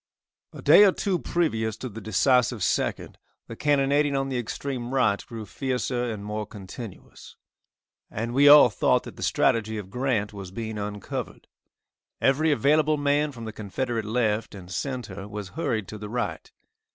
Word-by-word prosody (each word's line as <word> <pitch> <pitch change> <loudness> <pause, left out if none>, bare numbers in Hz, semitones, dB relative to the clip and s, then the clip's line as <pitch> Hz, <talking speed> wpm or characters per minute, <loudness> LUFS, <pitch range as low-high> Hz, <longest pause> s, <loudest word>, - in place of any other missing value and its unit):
A - - -11
day - - +8
or 200 - +6
two 185 -1 -1
previous 110 -11 -1
to 130 - -5
the 115 -1 -8
decisive 120 +2 +2
2nd, - - -1 0.3
the 115 - -9
cannonading 145 +1 +2
on 135 0 -1
the 130 -2 -1
extreme 125 +1 -4
right 110 -6 +2
grew 115 -3 -7
fiercer 125 0 -2
and 105 -2 -6
more 105 0 -4
continuous, 105 0 -10 0.7
and 115 +2 -4
we 140 +2 +6
all 145 -5 +9
thought 90 - +2
that - - -10
the - - -11
strategy 110 -1 +1
of 95 -2 -7
Grant 125 -5 -1
was 100 -3 -8
being 110 +2 -5
uncovered. 105 -1 -5 0.7
Every 150 +4 +3
available 150 +2 +3
man 145 +1 +1
from 115 -4 -9
the 110 - -6
Confederate 110 +3 -3
left 110 -1 -1
and 90 -2 -11
centre 105 -5 -4
was 105 -2 -6
hurried 110 +2 -2
to 110 - -7
the 105 0 -7
right. 110 -9 -4
115 Hz, 165 wpm, -26 LUFS, 105-135 Hz, 0.7 s, all